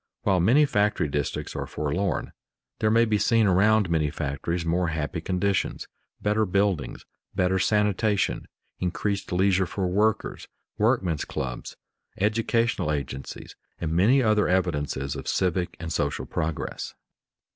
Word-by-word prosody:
While 95 -3 +3
many 125 - +5
factory 105 - +1
districts 75 0 -3
are - - -3
forlorn, 90 +6 -2 0.5
there 110 - +2
may 115 +2 +4
be 105 -2 +1
seen 115 +2 +3
around 105 +2 +4
many 80 -3 +1
factories 80 +4 -3
more 85 +2 +1
happy 80 +1 -3
conditions, 95 +3 -1 0.4
better 105 +1 +2
buildings, 95 -5 0 0.3
better 95 0 +2
sanitation, 105 +1 +1 0.3
increased 100 +3 -2
leisure 95 0 +2
for 95 +2 -2
workers, 105 +4 0 0.3
workmen's 105 - +1
clubs, 60 -2 -5 0.4
educational 115 -3 +1
agencies, 70 -2 -5 0.2
and 80 -1 -2
many 115 +10 +4
other 110 -2 +3
evidences 75 -7 0
of - - -7
civic 90 -1 0
and 80 -1 -4
social 70 -1 -1
progress. 80 -1 -4
95 Hz, 125 wpm, -26 LUFS, 80-105 Hz, 0.5 s, many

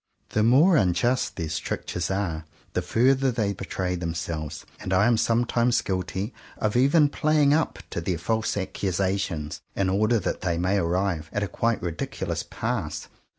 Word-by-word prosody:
The 105 - +1
more 145 - +6
unjust 105 +7 +1
their 80 -3 -3
strictures 80 +3 -3
are, 90 -5 -2 0.3
the 90 - 0
further 130 +8 +3
they 110 -4 0
betray 95 -1 -3
themselves; 80 -3 -4
and 95 - -3
I 95 +2 +4
am 120 0 +4
sometimes 120 +1 +2
guilty 95 +3 -3 0.2
of 105 +1 -1
even 140 +5 +5
playing 150 0 +3
up 155 +1 +1
to 85 - -2
their 90 0 -1
false 110 +6 -1
accusations 95 -4 -2
in 95 -1 +1
order 110 +4 +3
that - - -3
they 85 -3 0
may 90 +4 +1
arrive 85 -2 0
at 105 - -1
a - - -1
quite 115 +2 -1
ridiculous 85 -3 -3
pass. 95 -10 -4
100 Hz, 155 wpm, -25 LUFS, 85-115 Hz, 0.3 s, more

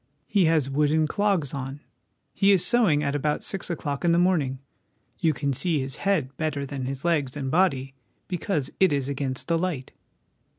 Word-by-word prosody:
He 200 -4 +2
has 160 -4 +2
wooden 150 +3 +2
clogs 190 -4 0
on. 135 0 -5 0.5
He 200 0 +4
is 190 -3 +4
sowing 205 -12 +3
at 140 -1 0
about 150 +1 -1
six 195 -2 -2
o'clock 145 -4 -3
in 170 -1 +3
the - - +3
morning. 165 -7 +2 0.6
You 165 -3 +3
can 140 0 -1
see 150 +4 0
his 135 -1 -3
head 165 -10 0
better 150 -3 -2
than 135 -2 -5
his 135 +2 -4
legs 150 -5 0
and 135 -2 -3
body, 135 -7 +1 0.3
because 170 -6 -2
it 190 -3 +5
is 140 -2 0
against 135 -2 -3
the 165 -1 +1
light." 165 -8 -3
150 Hz, 180 wpm, -25 LUFS, 135-175 Hz, 0.6 s, it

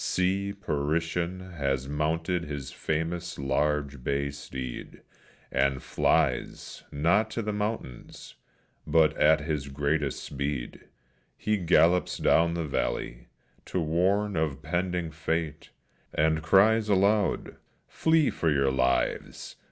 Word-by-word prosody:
See, 95 +2 0
Periton 85 +1 -2
has 70 -2 -1
mounted 80 +4 -1
his 70 -2 -6
famous 85 +4 -3
large 70 0 -1
bay 70 +1 -1
steed, 65 -3 -7 0.5
And 70 -1 +1
flies, 75 -7 0
not 85 +9 +2
to 115 - -3
the 105 0 -2
mountains, 105 - -5 0.5
but 80 -2 +4
at 80 0 +4
his 75 -3 -3
greatest 70 0 -1
speed 70 -2 -4 0.5
He 105 - 0
gallops 90 0 +3
down 85 +1 +3
the 85 -1 -2
valley, - - -3 0.4
to 95 - -2
warn 95 +6 +1
of 75 -3 -1
pending 90 0 -1
fate, 80 -1 -3 0.5
And 80 +1 +2
cries 105 +6 +4
aloud, 100 +1 +2 0.3
"Flee 160 -2 +2
for 80 - 0
your 70 -2 +2
lives! 65 -1 -1
80 Hz, 115 wpm, -28 LUFS, 70-90 Hz, 0.5 s, but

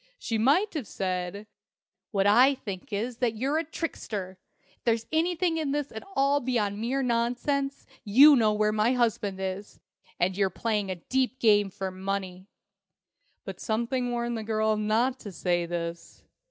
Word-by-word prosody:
She 225 - -2
might 305 - +3
have 290 - -4
said, 185 +2 -3 0.6
"What 195 -3 +1
I 250 +7 +6
think 200 -5 -8
is, 225 +4 -3
that 240 -3 0
you're 275 +7 0
a - - -1
trickster. 205 - -5 0.4
If - - -44
there's 230 -1 +1
anything 335 +1 +1
in 300 -3 -1
this 290 -1 -2
at 220 - -7
all 275 +1 +3
beyond 220 -6 -1
mere 260 +4 -1
nonsense, 250 +4 -1 0.2
you 275 +8 +8
know 220 -4 +3
where 210 0 +1
my 215 +3 +2
husband 220 -5 0
is, 190 +2 -5 0.4
and 185 +1 +1
you're 195 -1 +2
playing 210 0 -2
a 185 - -2
deep 260 +8 -1
game 205 -3 +4
for 190 0 -5
money." 190 0 -4 1.0
But - - -7
something 235 +3 -1
warned 235 -1 -2
the - - -5
girl 215 0 +1
not 225 +5 +1
to 205 - -8
say 175 -1 -1
this. 170 0 -6
220 Hz, 165 wpm, -27 LUFS, 200-260 Hz, 1.0 s, you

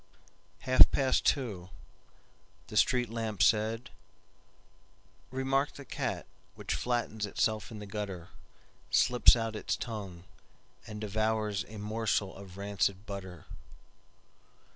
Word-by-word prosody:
Half 130 0 +7
past 135 -2 +2
two, 105 -10 0 1.0
The - - -8
street 125 -2 +3
lamp 110 -3 -1
said,"Remark 130 +4 -3
the 140 - -10
cat - - -3 0.3
which - - -3
flattens 115 -3 -1
itself 110 0 0
in 110 - -8
the 105 - -7
gutter, 100 -4 -5 0.6
Slips 125 0 +6
out 115 -1 -2
its 105 - -2
tongueAnd 105 0 -9
devours 110 0 0
a 110 - -10
morsel 105 -2 -1
of 95 -1 -11
rancid 100 0 -1
butter." 95 -5 -7
110 Hz, 100 wpm, -31 LUFS, 100-115 Hz, 1.0 s, Half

